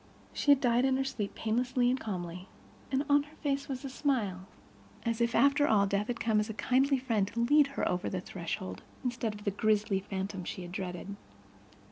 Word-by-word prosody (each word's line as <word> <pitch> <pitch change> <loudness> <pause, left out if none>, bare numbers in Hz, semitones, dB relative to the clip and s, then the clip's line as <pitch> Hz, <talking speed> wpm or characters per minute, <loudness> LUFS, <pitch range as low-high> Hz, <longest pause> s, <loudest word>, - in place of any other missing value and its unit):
She - - -2
had 285 -2 +8
died 245 -1 +3
in 265 -1 +3
her 270 - +1
sleep, 245 -7 -4
painlessly 245 +3 +1
and 255 +2 +2
calmly, 180 -4 -5 0.4
and 270 +2 +1
on 285 0 +5
her 295 +2 -13
face 280 -2 -2
was 265 0 -5
a - - -3
smile—as 195 - -3
if, 235 0 +1
after 280 +1 +4
all, 205 -2 +4
death 200 +1 0
had 240 -1 -3
come 220 -2 +2
as 210 +2 -1
a 220 - -5
kindly 270 +4 +2
friend 230 -6 0
to 230 +3 -5
lead 290 +4 +5
her - - +1
over 180 0 -1
the 185 - -2
threshold, 170 - -5 0.2
instead 240 -3 -2
of 205 - -10
the 200 - 0
grisly 210 -1 +1
phantom 190 -1 -4
she 180 - -5
had 175 - -8
dreaded. 185 +1 -5
220 Hz, 200 wpm, -31 LUFS, 195-260 Hz, 0.4 s, had